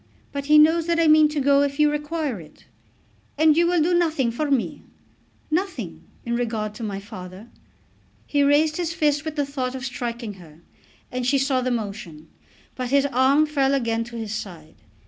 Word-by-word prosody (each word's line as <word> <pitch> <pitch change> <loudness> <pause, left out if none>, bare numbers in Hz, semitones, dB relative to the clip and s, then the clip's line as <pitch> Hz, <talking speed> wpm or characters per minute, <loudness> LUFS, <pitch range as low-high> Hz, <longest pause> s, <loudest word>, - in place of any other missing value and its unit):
But 280 0 -5
he 305 0 +6
knows 320 +2 +5
that 335 0 +1
I 330 - +4
mean 310 0 +6
to 300 0 -2
go 280 0 +4
if 285 0 -1
you 300 0 +4
require 295 - -3
it." 155 - -17 0.7
"And 310 0 +5
you 340 +1 +3
will 350 0 +2
do 350 +3 +1
nothing 315 -8 +1
for 290 +6 -2
me?" 270 -4 -1 0.7
"Nothing, 270 - -3 0.2
in 235 0 -1
regard 220 -3 -2
to 225 - -8
my 200 -2 -4
father." 195 +1 -10 0.8
He 290 - 0
raised 295 +2 +3
his 335 -2 -2
fist 300 -2 +1
with 315 -1 -4
the 290 -2 0
thought 265 -2 -4
of 260 0 -5
striking 240 -3 -5
her, 160 -1 -16 0.5
and 250 0 -3
she 275 +2 +3
saw 270 -1 +1
the 255 - -1
motion. 200 -9 -5 0.4
But 255 -1 -4
his 280 +1 +3
arm 270 +4 +4
fell 280 -2 +1
again 230 -3 0
to 235 0 -11
his 220 -2 -5
side. 175 -8 -8
270 Hz, 190 wpm, -23 LUFS, 230-300 Hz, 0.8 s, he